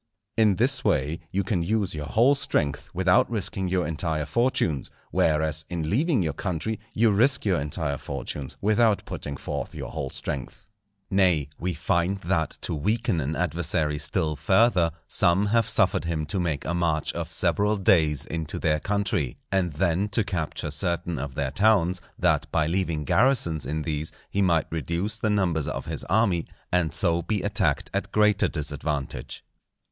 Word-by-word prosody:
In 110 -3 +4
this 130 +5 +2
way 80 -5 +1
you 100 +1 0
can 90 -2 0
use 100 +2 0
your 75 -2 -5
whole 120 +6 +4
strength 75 - -1
without 95 0 +3
risking 95 -4 -1
your 90 -1 0
entire 80 -1 -2
fortunes; 80 - +1 0.2
whereas, 80 0 +1
in 80 -3 -3
leaving 135 - +2
your 80 -3 -1
country, 95 +6 -3 0.2
you 115 0 +4
risk 120 +7 +3
your 95 -7 +2
entire 70 -1 -2
fortunes, 70 -3 -5
without 110 0 +3
putting 70 -1 -5
forth - - -5
your - - -6
whole 70 -4 -4
strength. 70 +10 -6 0.4
Nay, 90 -8 +3
we 90 0 -2
find 85 +3 0
that 85 -2 -1
to - - -1
weaken 105 - 0
an 75 +3 -2
adversary 80 -2 0
still 75 +1 0
further, 95 - +3 0.2
some 90 +4 +3
have 115 +1 +2
suffered - - +2
him 80 -2 -2
to 85 +6 -3
make 80 -5 -2
a 85 - -1
march 80 -3 0
of - - -5
several 105 +1 +2
days 80 -7 +3
into 80 -1 -4
their 75 -1 +1
country, 100 - -1
and 90 -4 +1
then 90 +5 +1
to 110 +2 0
capture 85 -6 -3
certain 85 -2 -2
of 70 -1 -5
their 70 -2 -1
towns, 95 0 +3 0.2
that 75 -4 +1
by 80 -2 +2
leaving 85 -2 -1
garrisons 85 - +2
in 75 +2 -2
these, 75 -1 -2 0.2
he 100 - +1
might 85 -4 +3
reduce 85 - -2
the 110 - 0
numbers 90 -8 +1
of - - -4
his - - -4
army, 95 -3 +2 0.2
and 90 -3 +2
so 85 -2 +1
be 105 +2 -2
attacked 100 -7 0
at - - -2
greater 105 -1 +3
disadvantage. 75 -2 -4
85 Hz, 165 wpm, -26 LUFS, 75-100 Hz, 0.4 s, In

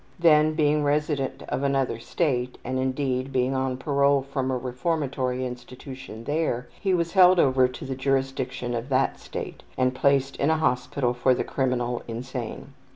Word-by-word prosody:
Then 155 -2 +4
being 150 -1 +2
resident 145 -1 0
of - - -1
another 135 -4 0
State, 125 -2 -1
and, 130 +1 -2
indeed, 130 0 -1
being 130 0 +1
on 130 -1 -1
parole 140 0 +2
from 135 -1 -2
a 130 - 0
reformatory 130 -1 -2
institution 125 -1 -8
there, 145 -3 -1
he 190 -2 +1
was 170 -1 -1
held 185 -1 +6
over 130 -3 +4
to 125 +2 -8
the 135 - -3
jurisdiction 130 -2 -1
of 120 +3 -3
that 135 0 +1
State, - - -7 0.2
and 130 0 +2
placed 135 +1 +2
in 140 - +1
a 160 - +3
hospital 125 -3 0
for 125 +1 +2
the - - -1
criminal 125 -2 -1
insane. 120 0 -6
130 Hz, 160 wpm, -25 LUFS, 125-145 Hz, 0.2 s, held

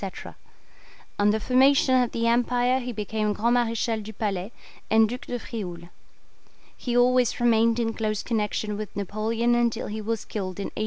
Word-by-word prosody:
On 205 0 +4
the 215 +1 +2
formation 260 +3 +4
of 245 - -1
the 230 0 -1
Empire 245 +2 +2
he 250 -1 -5
became 215 -1 -2
Grand 235 +3 +1
Marechal 230 -2 0
du 215 +1 -8
Palais, 200 -2 -3 0.4
and 220 +1 +5
Duc 250 +6 -7
de 245 - -3
Frioul. 180 -7 -7 0.9
He 245 -1 -2
always 250 0 +3
remained 230 -1 +3
in 225 -1 0
close 215 -2 -2
connection 210 -2 -2
with 215 -1 -7
Napoleon 220 +4 0
until 240 -1 +1
he 215 +1 -5
was 225 +1 -3
killed 190 -3 -5
in 200 - -3
1813. - - -28
225 Hz, 165 wpm, -25 LUFS, 210-240 Hz, 0.9 s, and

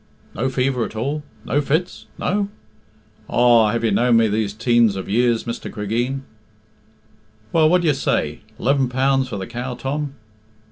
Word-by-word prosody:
"No 125 +6 -1
fever 130 -1 0
at 110 - -6
all? 140 +7 -2 0.2
No 145 +5 +1
fits? 160 +6 -2
No?" 200 +1 -1 0.8
"Aw, 120 -2 +4
have 115 +1 -1
you 115 - +2
known 120 +3 +4
me 115 -1 +4
these 105 -1 0
teens 115 -1 +2
of 95 - -5
years, 115 +2 +2
Mr. 115 - -5
Cregeen 120 +6 -2 0.7
" 110 0 -34
"Well, 160 -2 +5
what 180 +1 +3
d'ye 160 - +4
say 80 - -1 0.2
eleven 135 0 +1
pounds 135 +1 +1
for 105 - -4
the 95 - -4
cow, 125 +1 -5
Tom!" 140 +2 -3
120 Hz, 160 wpm, -21 LUFS, 110-135 Hz, 0.8 s, Well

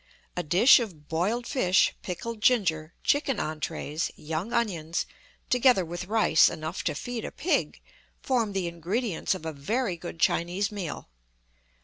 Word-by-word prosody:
A 180 - 0
dish 180 - +6
of 170 -11 -6
boiled 200 +9 0
fish, 190 -9 +3
pickled 215 +5 -5
ginger, 170 -10 +2
chicken 280 -5 +1
entrees, 155 0 -3
young 160 +8 -4
onions, 175 -9 -1 0.5
together 250 -6 +4
with 175 +2 -6
rice 215 -7 +5
enough 155 +1 -5
to - - 0
feed 240 +7 -4
a - - -5
pig, 355 - -1 0.4
form 235 -6 0
the 190 -2 -1
ingredients 180 +4 -1
of 165 - -9
a 160 - -3
very 185 - -1
good 170 -1 -8
Chinese 180 +5 +1
meal. 190 -7 -5
185 Hz, 140 wpm, -27 LUFS, 160-230 Hz, 0.5 s, dish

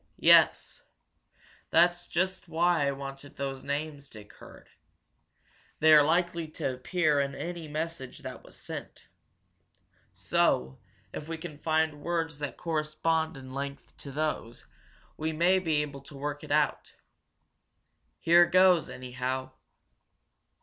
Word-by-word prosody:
"Yes. - - +4 0.9
That's 175 +1 +3
just 185 +1 -1
why 170 -2 +2
I - - +2
wanted 135 +1 -8
those 135 -1 -4
names 145 -1 -4
Dick 105 -1 -13
heard. - - -15 1.1
They 155 0 +6
are 150 - +9
likely 170 +2 +1
to 135 -3 -3
appear 150 +3 +1
in 140 -1 -1
any 170 0 -5
message 155 -3 -5
that - - -7
was - - -14
sent. - - -9 1.0
So, 65 +1 0 0.3
if 150 - -6
we 165 0 -4
can 160 -3 -9
find 155 -1 0
words 165 -2 -2
that 145 -1 -5
correspond 160 -1 -1
in 130 -1 -10
length 140 +1 -6
to 140 - -9
those, 145 -5 -3 0.5
we 160 +1 -2
may 175 +4 +3
be 160 -5 +1
able 140 -2 -8
to 140 +1 -13
work 145 +1 -4
it 150 - -8
out. 150 0 0 1.2
Here 170 +1 +6
goes, 185 -2 +4
anyhow!" 130 +1 -4
155 Hz, 130 wpm, -29 LUFS, 140-165 Hz, 1.2 s, are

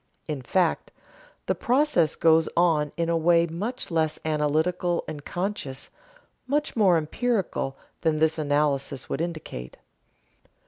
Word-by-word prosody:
In 150 -4 -4
fact 170 +6 0 0.5
the - - +1
process 245 - +2
goes 160 0 +4
on 160 -4 +3
in 170 -1 0
a 170 - +1
way 170 +1 +4
much 195 +8 -4
less 160 -2 0
analytical 160 +4 +1
and 145 -2 -6
conscious, 175 -8 -4 0.6
much 295 +3 0
more 195 -6 +5
empirical, 170 - -1 0.2
than 160 -2 +1
this 160 +1 +2
analysis 145 -2 0
would 140 - -2
indicate. 155 - -6
165 Hz, 125 wpm, -26 LUFS, 150-180 Hz, 0.6 s, more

